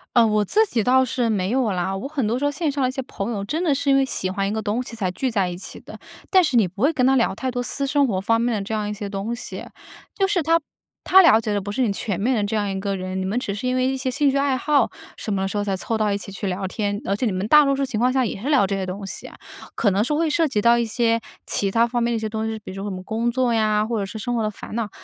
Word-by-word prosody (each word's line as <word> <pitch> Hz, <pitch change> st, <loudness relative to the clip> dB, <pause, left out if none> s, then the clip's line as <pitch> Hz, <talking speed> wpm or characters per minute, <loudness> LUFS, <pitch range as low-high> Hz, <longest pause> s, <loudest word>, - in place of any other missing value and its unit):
呃， 235 Hz, -2 st, +6 dB
我 210 Hz, -1 st, +2 dB
自 435 Hz, -, +3 dB
己 235 Hz, -, -1 dB
倒 260 Hz, +2 st, +4 dB
是 245 Hz, -1 st, -1 dB
没 195 Hz, -2 st, 0 dB
有 250 Hz, -4 st, +1 dB
啦。 190 Hz, +1 st, -1 dB
我 195 Hz, -, -5 dB
很 275 Hz, -5 st, -2 dB
多 230 Hz, +3 st, 0 dB
时 270 Hz, -, -4 dB
候 290 Hz, -, +2 dB
线 310 Hz, +1 st, -1 dB
上 280 Hz, 0 st, -2 dB
的 255 Hz, -, +2 dB
一 -, -, -3 dB
些 265 Hz, +1 st, -4 dB
朋 225 Hz, -3 st, -5 dB
友 200 Hz, -3 st, -3 dB
真 315 Hz, -, -2 dB
的 310 Hz, -5 st, +2 dB
是 280 Hz, +1 st, -1 dB
因 275 Hz, -, +5 dB
为 275 Hz, -, +4 dB
喜 190 Hz, -8 st, 0 dB
欢 195 Hz, +1 st, -1 dB
一 -, -, -2 dB
个 220 Hz, +1 st, -2 dB
东 220 Hz, +4 st, -1 dB
西 240 Hz, -, -8 dB
才 200 Hz, -5 st, -2 dB
聚 255 Hz, +7 st, -2 dB
在 200 Hz, -4 st, +1 dB
一 175 Hz, -1 st, -5 dB
起 185 Hz, -, -6 dB
的， -, -, -11 dB, 0.3 s
但 375 Hz, -2 st, +5 dB
是 270 Hz, -6 st, +2 dB
你 215 Hz, -5 st, +4 dB
不 190 Hz, +4 st, -10 dB
会 285 Hz, +5 st, +4 dB
跟 260 Hz, -5 st, +2 dB
他 270 Hz, -, +4 dB
聊 235 Hz, -6 st, +2 dB
太 260 Hz, +6 st, -3 dB
多 245 Hz, 0 st, -2 dB
私 275 Hz, +3 st, 0 dB
生 285 Hz, 0 st, +3 dB
活 200 Hz, -7 st, -1 dB
方 230 Hz, +4 st, +1 dB
面 240 Hz, 0 st, +1 dB
的 205 Hz, -, -2 dB
这 195 Hz, +3 st, -5 dB
样 210 Hz, -1 st, -1 dB
一 -, -, -3 dB
些 205 Hz, -1 st, -5 dB
东 200 Hz, +3 st, -3 dB
西。 235 Hz, -, -6 dB, 0.5 s
就 390 Hz, -, +1 dB
是 380 Hz, -4 st, +1 dB
他 330 Hz, +2 st, +3 dB, 0.5 s
他 380 Hz, +1 st, +7 dB
了 225 Hz, -10 st, +6 dB
解 220 Hz, -1 st, -3 dB
的 205 Hz, -, +1 dB
不 205 Hz, +1 st, -5 dB
是 235 Hz, -, -2 dB
你 235 Hz, -5 st, +2 dB
全 200 Hz, -1 st, -2 dB
面 250 Hz, +6 st, +1 dB
的 210 Hz, -, 0 dB
这 205 Hz, +2 st, -2 dB
样 205 Hz, -1 st, -1 dB
一 195 Hz, -, -3 dB
个 200 Hz, 0 st, -2 dB
人， 185 Hz, 0 st, -4 dB
你 -, -, -2 dB
们 205 Hz, +6 st, -1 dB
只 200 Hz, -5 st, -4 dB
是 210 Hz, -, -5 dB
因 255 Hz, -, 0 dB
为 255 Hz, 0 st, +2 dB
一 265 Hz, -, 0 dB
些 260 Hz, -1 st, -2 dB
兴 285 Hz, +3 st, +2 dB
趣 275 Hz, -, +1 dB
爱 275 Hz, -1 st, +2 dB
好 295 Hz, +2 st, +2 dB, 0.3 s
什 215 Hz, -, -3 dB
么 195 Hz, 0 st, 0 dB
时 200 Hz, -, -3 dB
候 205 Hz, -, 0 dB
才 200 Hz, -2 st, -1 dB
凑 225 Hz, +4 st, -2 dB
到 215 Hz, -1 st, +1 dB
一 200 Hz, -, 0 dB
起 200 Hz, -, -8 dB
去 195 Hz, +1 st, -6 dB
聊 190 Hz, 0 st, -2 dB
天， 205 Hz, +1 st, -2 dB
而 195 Hz, -, 0 dB
且 230 Hz, -, -1 dB
你 220 Hz, -, +1 dB
们 185 Hz, +2 st, -2 dB
大 300 Hz, +5 st, +7 dB
多 275 Hz, 0 st, +2 dB
数 275 Hz, -, -1 dB
情 250 Hz, -5 st, -3 dB
况 250 Hz, +2 st, +3 dB
下 265 Hz, -1 st, +2 dB
也 205 Hz, -, -4 dB
是 250 Hz, +8 st, -4 dB
聊 275 Hz, -9 st, +4 dB
这 195 Hz, -, -1 dB
些 195 Hz, -1 st, -2 dB
东 190 Hz, +2 st, -6 dB
西 -, -, -6 dB
啊。 -, -, -13 dB, 0.4 s
可 210 Hz, -, +2 dB
能 200 Hz, +2 st, +1 dB
是 260 Hz, -, -1 dB
会 320 Hz, +2 st, +1 dB
涉 320 Hz, +2 st, +2 dB
及 215 Hz, -7 st, 0 dB
到 235 Hz, +2 st, +5 dB
一 235 Hz, -, +1 dB
些 230 Hz, +1 st, +1 dB, 0.3 s
其 200 Hz, -1 st, 0 dB
它 230 Hz, +3 st, +3 dB
方 240 Hz, 0 st, -1 dB
面 235 Hz, -, +1 dB
的 -, -, 0 dB
一 -, -, -2 dB
些 220 Hz, 0 st, -3 dB
东 220 Hz, 0 st, -3 dB
西， 220 Hz, 0 st, -4 dB
比 215 Hz, -, -11 dB
如 -, -, -9 dB
说 195 Hz, +1 st, -5 dB
我 205 Hz, -, -3 dB
们 185 Hz, -1 st, -6 dB
工 230 Hz, +4 st, -1 dB
作 250 Hz, 0 st, +1 dB
呀， 215 Hz, -1 st, +2 dB
或 230 Hz, +1 st, -2 dB
者 200 Hz, -, -1 dB
是 220 Hz, +3 st, -7 dB
生 245 Hz, +2 st, -2 dB
活 230 Hz, -, 0 dB
的 215 Hz, -, -1 dB
烦 210 Hz, -, -9 dB
恼， 230 Hz, -3 st, -2 dB
225 Hz, 370 characters per minute, -22 LUFS, 200-260 Hz, 0.5 s, 他